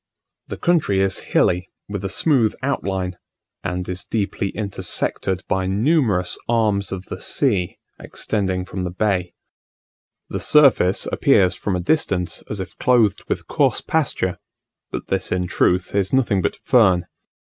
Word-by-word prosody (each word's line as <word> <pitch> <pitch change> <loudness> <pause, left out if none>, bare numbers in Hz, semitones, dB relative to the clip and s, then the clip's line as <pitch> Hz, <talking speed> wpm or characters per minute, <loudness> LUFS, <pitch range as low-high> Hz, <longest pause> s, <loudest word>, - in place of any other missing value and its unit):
The - - -6
country 160 - +2
is 95 -1 +1
hilly, 90 +1 +2 0.2
with 100 -1 -5
a 95 - -2
smooth 120 - +2
outline, 95 -9 -2 0.4
and 90 0 -3
is 90 +1 -4
deeply 100 -2 -2
intersected 95 -2 -2
by 95 0 0
numerous 105 - +1
arms 105 -4 +1
of 95 -1 -5
the - - -7
sea 100 -11 0 0.2
extending 95 -4 -2
from 95 0 -5
the 90 - -2
bay. 95 -1 -1 0.9
The - - -4
surface 135 -11 +4
appears 95 -10 +3
from 95 +1 -2
a - - -1
distance 90 - 0
as 105 - -4
if 95 - -6
clothed 120 -6 +3
with - - -2
coarse - - +1
pasture, 130 - -1 0.5
but - - -6
this 95 -1 -2
in 90 -1 0
truth 90 0 +1
is 100 -1 +1
nothing 115 -7 +2
but - - -1
fern. 95 -9 +3
95 Hz, 145 wpm, -21 LUFS, 90-110 Hz, 0.9 s, surface